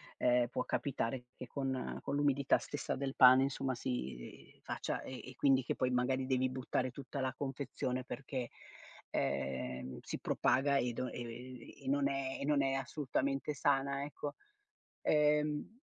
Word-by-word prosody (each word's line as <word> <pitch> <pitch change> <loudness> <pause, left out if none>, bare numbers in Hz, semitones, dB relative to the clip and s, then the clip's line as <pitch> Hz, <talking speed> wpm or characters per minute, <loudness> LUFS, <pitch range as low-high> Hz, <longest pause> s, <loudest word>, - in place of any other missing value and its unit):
ehm, 125 -1 +3
può 125 - -2
capitare 125 -2 -1
che - - -7
con, 135 +1 -2
ehm, 130 - -4
con 140 - -3
l'umidità 140 -1 +3
stessa 145 - -3
del 135 0 -3
pane 130 +1 +9
insomma 135 -1 -1
si 65 - -5
faccia, - - -3
e 130 -1 -7
e - - -15
quindi 135 0 +4
che - - -1
poi 130 - +1
magari 130 +1 +1
devi 130 0 +2
buttare 130 0 -1
tutta 140 +2 -6
la 130 -1 0
confezione 135 -2 -3
perché, 130 -2 -4 0.6
ehm, 65 -1 -2
si - - -5
propaga 140 +1 +2
e 125 -3 +1
do 125 +2 -2
ehm, 125 +1 -7 0.2
e 130 - -8
non 140 0 +3
è 135 -1 -2
e - - -2
non 145 -1 +3
è 135 0 +1
assolutamente 135 +1 -1
sana 140 -1 +1
ecco, 145 0 -5 0.7
ehm 150 0 +3
130 Hz, 160 wpm, -35 LUFS, 125-140 Hz, 0.7 s, pane